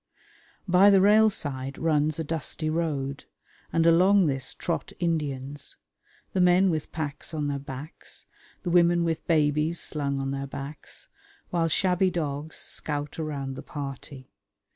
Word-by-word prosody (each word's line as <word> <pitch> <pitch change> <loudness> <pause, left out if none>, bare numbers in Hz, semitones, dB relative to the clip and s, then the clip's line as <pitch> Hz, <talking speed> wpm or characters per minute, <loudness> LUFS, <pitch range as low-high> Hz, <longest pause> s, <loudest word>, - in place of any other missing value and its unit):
By 185 +3 +6
the 195 -1 +6
rail 215 +3 +6
side 135 -7 -5
runs 155 -1 +1
a 160 - -2
dusty 155 0 -3
road, 145 -4 -2 0.5
and 165 0 +2
along 185 +4 +5
this 135 -3 -1
trot 170 - -3
Indians, 145 -4 -3 0.6
the 185 - +2
men 180 +1 +5
with 155 -2 -3
packs 155 0 -5
on 150 -2 -1
their 140 -1 -2
backs, 140 +3 -10 0.4
the 175 - -2
women 175 0 +4
with 165 -1 -2
babies 155 +1 +2
slung 140 -2 -2
on 135 0 -2
their 140 0 -3
backs, 140 +2 -8 0.4
while 170 -2 +1
shabby 185 +2 +2
dogs 155 -3 -3
scout 145 0 -4
around 140 -4 -3
the 135 - -7
party. 135 -2 -8
155 Hz, 140 wpm, -27 LUFS, 140-170 Hz, 0.6 s, By